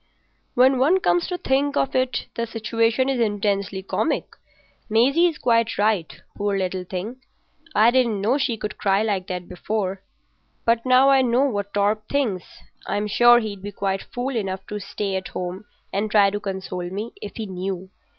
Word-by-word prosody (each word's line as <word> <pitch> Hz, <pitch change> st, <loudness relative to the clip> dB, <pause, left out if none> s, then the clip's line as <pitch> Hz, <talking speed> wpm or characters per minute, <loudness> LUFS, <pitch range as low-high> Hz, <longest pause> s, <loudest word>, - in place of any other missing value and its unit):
"When 255 Hz, +1 st, +5 dB
one 320 Hz, +9 st, +4 dB
comes 350 Hz, -2 st, +1 dB
to 360 Hz, -, -3 dB
think 285 Hz, -1 st, 0 dB
of 270 Hz, -, +1 dB
it 255 Hz, 0 st, 0 dB
the 235 Hz, 0 st, -3 dB
situation 230 Hz, +2 st, 0 dB
is 270 Hz, -2 st, 0 dB
intensely 200 Hz, -3 st, 0 dB
comic. -, -, -2 dB, 0.5 s
Maisie's 275 Hz, +10 st, +3 dB
quite 230 Hz, -1 st, +1 dB
right—poor 205 Hz, 0 st, -1 dB
little 185 Hz, -1 st, -2 dB
thing. 195 Hz, +8 st, -6 dB, 0.5 s
I 220 Hz, +3 st, +6 dB
didn't 240 Hz, -5 st, +2 dB
know 235 Hz, +8 st, +1 dB
she 240 Hz, -4 st, 0 dB
could 210 Hz, 0 st, -6 dB
cry 195 Hz, +1 st, +2 dB
like 200 Hz, -4 st, -1 dB
that 180 Hz, -2 st, -5 dB
before; 195 Hz, +1 st, -3 dB, 0.6 s
but 230 Hz, 0 st, +2 dB
now 255 Hz, +2 st, +6 dB
I 270 Hz, -1 st, +5 dB
know 250 Hz, +1 st, +2 dB
what 205 Hz, -7 st, -2 dB
Torp 210 Hz, +1 st, +1 dB
thinks, 235 Hz, -11 st, 0 dB, 0.4 s
I'm 205 Hz, +1 st, -1 dB
sure 240 Hz, +3 st, +6 dB
he'd 210 Hz, -4 st, -5 dB
be 205 Hz, +1 st, -6 dB
quite 195 Hz, -1 st, -2 dB
fool 250 Hz, +2 st, -3 dB
enough 190 Hz, -3 st, -3 dB
to 210 Hz, -, -4 dB
stay 200 Hz, 0 st, -3 dB
at 190 Hz, -, -5 dB
home 185 Hz, +3 st, -5 dB, 0.3 s
and 205 Hz, +2 st, 0 dB
try 205 Hz, -2 st, +5 dB
to 205 Hz, -, -2 dB
console 190 Hz, -3 st, -5 dB
me—if 205 Hz, +1 st, -7 dB
he 220 Hz, -, -4 dB
knew. 190 Hz, 0 st, -5 dB
210 Hz, 170 wpm, -23 LUFS, 195-245 Hz, 0.6 s, I